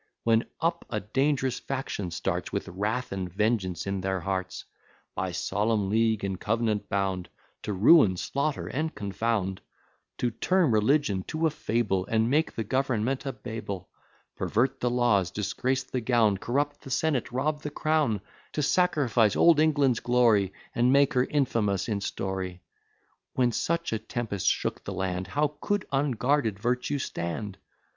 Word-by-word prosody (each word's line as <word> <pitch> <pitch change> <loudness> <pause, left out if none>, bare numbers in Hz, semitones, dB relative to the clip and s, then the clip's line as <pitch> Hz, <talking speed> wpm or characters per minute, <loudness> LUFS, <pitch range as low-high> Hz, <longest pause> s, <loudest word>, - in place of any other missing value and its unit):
When 115 0 +3
up 170 +1 0
a 110 - -1
dangerous 130 +4 0
faction 130 -8 -4
starts, 85 - -2
With - - -3
wrath 105 +7 -2
and 95 -2 -4
vengeance 100 -2 0
in 100 -1 -2
their 95 0 -1
hearts; 95 -1 -3 0.5
By 95 -1 -2
solemn 100 +2 0
League 110 -1 +2
and 95 -2 -2
Cov'nant 110 -1 0
bound, 95 -2 -1 0.3
To - - -4
ruin, 100 - +6
slaughter, 140 +8 -2
and 155 +3 -3
confound; 100 -1 -1 0.6
To 120 - 0
turn 175 +6 +2
religion 110 -2 +2
to 160 +1 -1
a 160 - +3
fable, 105 -8 -1
And 115 +2 +1
make 155 +3 +1
the 115 - -1
government 130 +2 -1
a - - 0
Babel; 110 -7 -6 0.5
Pervert 130 +5 0
the 125 - +1
laws, 120 -7 +2
disgrace 125 +7 -1
the 125 - -3
gown, 115 -4 +3
Corrupt 145 +5 -1
the - - -10
senate, 135 -1 0
rob 150 +4 -1
the 150 - -4
crown; 150 -8 +1 0.3
To 150 - -1
sacrifice 135 - +3
old 170 -3 +6
England's 145 -6 +3
glory, 115 -6 +3 0.2
And 120 +2 +3
make 140 +1 +4
her 125 0 +3
infamous 110 -9 0
in 105 -3 -1
story: 95 -2 -4 0.7
When 125 -2 +2
such 170 +4 -1
a 110 - 0
tempest 110 -3 -3
shook - - 0
the - - -5
land, 95 -1 -2
How 150 0 -1
could 205 -2 0
unguarded 135 -4 +1
Virtue 125 +6 -1
stand! 95 -3 -4
115 Hz, 150 wpm, -27 LUFS, 100-135 Hz, 0.7 s, ruin